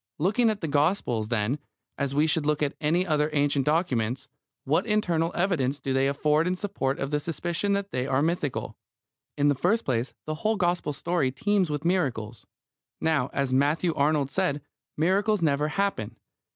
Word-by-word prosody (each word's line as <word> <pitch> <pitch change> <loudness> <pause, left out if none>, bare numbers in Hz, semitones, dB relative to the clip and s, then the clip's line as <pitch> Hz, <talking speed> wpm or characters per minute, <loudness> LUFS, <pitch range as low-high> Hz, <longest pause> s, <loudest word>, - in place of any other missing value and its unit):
Looking 210 +8 +2
at 215 -2 -2
the 165 - -2
Gospels, 145 - +1
then, 120 +4 0 0.4
as 140 -1 -2
we 150 +2 +4
should 160 0 +1
look 150 0 +1
at 145 - 0
any 165 +4 +2
other 150 -3 +1
ancient 145 -1 +1
documents, 130 -5 0 0.4
what 160 - +1
internal 175 -6 +1
evidence 150 -7 0
do 135 - -2
they 135 +1 +2
afford 150 +3 +2
in 180 - 0
support 185 -9 -2
of 140 +1 -3
the 150 - +1
suspicion 170 +5 -2
that 200 0 -2
they 125 +1 -2
are 135 +1 +1
mythical? 160 -4 -2 0.6
In 145 0 +3
the 145 - +4
first 195 - +1
place, 120 -1 -1
the 155 - -2
whole 220 +1 +2
Gospel 175 -5 0
story 165 -3 0
teems 200 +4 +1
with 150 +1 -3
miracles. 125 - -1 0.5
Now, 155 -5 +1
as 140 -2 -1
Matthew 150 +6 +2
Arnold 145 -2 +1
said, 150 -7 0 0.3
miracles 195 +4 +2
never 150 -1 +2
happen. 150 - -2
150 Hz, 175 wpm, -26 LUFS, 140-180 Hz, 0.6 s, we